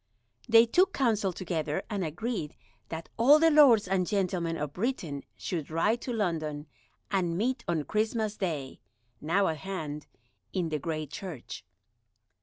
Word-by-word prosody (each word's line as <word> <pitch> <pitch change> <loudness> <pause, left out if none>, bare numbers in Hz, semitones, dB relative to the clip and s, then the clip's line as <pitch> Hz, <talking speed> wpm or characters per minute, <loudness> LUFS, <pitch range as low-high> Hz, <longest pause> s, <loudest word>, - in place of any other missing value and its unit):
They 225 +1 +8
took 355 +11 +3
counsel 215 -7 +1
together, 165 -4 -3
and 205 -4 -2
agreed 170 0 -3 0.3
that 165 0 -6
all 270 +6 +7
the 325 +1 +5
lords 260 -9 +6
and 185 -1 +1
gentlemen 180 -5 0
of 145 -1 -4
Britain 180 - -2 0.2
should 165 -6 -4
ride 210 +9 +1
to 250 - -4
London 160 -9 -2 0.5
and 175 -4 0
meet 245 +4 0
on 165 -3 0
Christmas 215 +2 -1
Day, 155 -10 -3 0.4
now 185 +6 +2
at 160 - -1
hand, 150 -4 -5 0.5
in 180 -4 -1
the 155 -1 -1
Great 155 -1 -4
Church. 150 - -7
185 Hz, 145 wpm, -29 LUFS, 155-220 Hz, 0.5 s, They